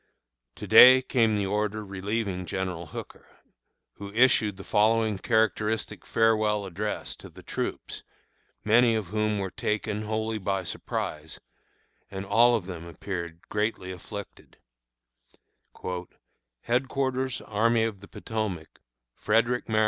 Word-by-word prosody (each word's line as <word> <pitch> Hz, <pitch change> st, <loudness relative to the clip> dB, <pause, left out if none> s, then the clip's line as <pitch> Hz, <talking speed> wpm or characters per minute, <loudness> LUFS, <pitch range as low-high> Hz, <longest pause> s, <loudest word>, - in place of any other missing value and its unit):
To -, -, -7 dB
day 130 Hz, +1 st, +9 dB
came 115 Hz, -4 st, +2 dB
the 100 Hz, -, 0 dB
order 105 Hz, +1 st, -1 dB
relieving 100 Hz, -1 st, -3 dB
General 90 Hz, -2 st, -3 dB
Hooker, -, -, -9 dB, 0.7 s
who 100 Hz, 0 st, -8 dB
issued 110 Hz, -4 st, +3 dB
the 95 Hz, -, -9 dB
following 110 Hz, -1 st, +2 dB
characteristic 110 Hz, 0 st, 0 dB
farewell 110 Hz, -2 st, +2 dB
address 100 Hz, +3 st, -4 dB
to -, -, -12 dB
the -, -, -15 dB
troops, -, -, -4 dB, 0.6 s
many 115 Hz, +2 st, +4 dB
of 105 Hz, -5 st, -3 dB
whom 110 Hz, +1 st, 0 dB
were 95 Hz, -2 st, -3 dB
taken, 105 Hz, 0 st, -2 dB
wholly 110 Hz, +1 st, -2 dB
by 95 Hz, -1 st, -1 dB
surprise, 80 Hz, -2 st, -4 dB, 0.7 s
and 95 Hz, 0 st, -6 dB
all 115 Hz, +5 st, +5 dB
of 105 Hz, -6 st, -2 dB
them 90 Hz, -3 st, -7 dB
appeared 85 Hz, -1 st, -6 dB
greatly 105 Hz, -3 st, -2 dB
afflicted: 100 Hz, +3 st, -9 dB, 2.1 s
HEADQUARTERS 130 Hz, +1 st, -1 dB
ARMY 115 Hz, +2 st, +1 dB
OF 110 Hz, -3 st, -2 dB
THE 100 Hz, -, -13 dB
POTOMAC, 105 Hz, -9 st, -5 dB, 0.3 s
Frederick, 115 Hz, -, +1 dB
Md. 110 Hz, -1 st, +1 dB
105 Hz, 120 wpm, -27 LUFS, 95-115 Hz, 2.1 s, day